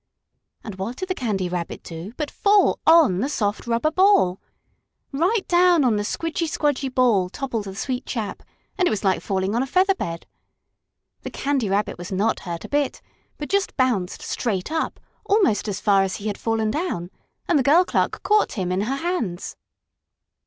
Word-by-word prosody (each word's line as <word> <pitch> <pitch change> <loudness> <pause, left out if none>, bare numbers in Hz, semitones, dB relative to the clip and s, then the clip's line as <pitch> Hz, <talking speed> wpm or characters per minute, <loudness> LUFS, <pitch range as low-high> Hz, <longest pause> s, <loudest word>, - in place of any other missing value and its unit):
And 210 -4 -8
what 215 +6 -3
did 375 +7 -6
the - - +1
Candy 210 - -2
Rabbit 175 -1 -4
do 165 +4 -8
but 300 -2 -3
fall 405 -1 +3
on 320 - +6
the 265 +7 -1
soft, 210 -5 -2
rubber 235 +7 +1
ball! 370 - +3 0.7
Right 365 +9 0
down 350 -3 +4
on 240 -4 +3
the 205 - 0
squidgy 330 +8 -2
squdgy 290 -3 0
ball 230 -8 +3
toppled 235 -2 -4
the 190 -1 -7
sweet 255 +4 -3
chap, 220 -5 -4 0.4
and 365 - +4
it - - +3
was 215 - -2
like 190 -2 +2
falling 190 +1 -1
on 235 - +1
a 265 - -2
feather 375 +7 +3
bed. 170 - -5 1.0
The - - -6
Candy 270 -7 -1
Rabbit 200 -1 -1
was 175 +2 -7
not 200 +4 +1
hurt 170 -2 -6
a - - -9
bit, 285 -1 0 0.4
but 295 - -5
just 395 0 -1
bounced 235 -9 0
straight 210 0 -2
up, 320 0 -2 0.3
almost 390 - +2
as 205 - -3
far 200 -2 +3
as 195 -1 -1
he 205 - -8
had 210 -2 -2
fallen 225 -1 0
down, 250 - -3 0.4
and 335 -4 +3
the - - +2
girl 325 +7 +5
clerk - - -1
caught 420 +3 +2
him 185 -4 -2
in 185 +1 0
her 245 +6 -1
hands. 275 - -3
240 Hz, 190 wpm, -23 LUFS, 195-320 Hz, 1.0 s, on